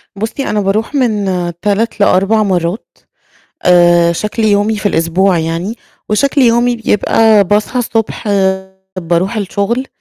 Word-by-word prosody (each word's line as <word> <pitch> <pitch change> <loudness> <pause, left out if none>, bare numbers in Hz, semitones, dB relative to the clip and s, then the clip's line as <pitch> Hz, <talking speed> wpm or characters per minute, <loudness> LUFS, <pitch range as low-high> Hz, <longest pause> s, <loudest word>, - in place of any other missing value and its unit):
بُصي 225 +7 -4
أنا 210 - 0
باروح 215 +8 -2
من 220 -6 0 0.4
3 210 +2 -1
ل4 200 +2 +2
مَرّات، 180 +1 -3 0.7
آآ، 175 -1 +4
شكل 210 +6 -3
يومي 210 +1 +2
في 205 - -8
الأسبوع 175 +1 +1
يعني 165 +7 -3 0.3
وشكل 275 +6 +1
يومي 240 0 +2
بيبقى 220 -1 +2
باصحى 210 +6 0
الصبح 225 -2 -3 0.7
باروح 175 +6 -1
الشغل، 210 +6 -2
205 Hz, 120 wpm, -13 LUFS, 185-225 Hz, 0.7 s, آآ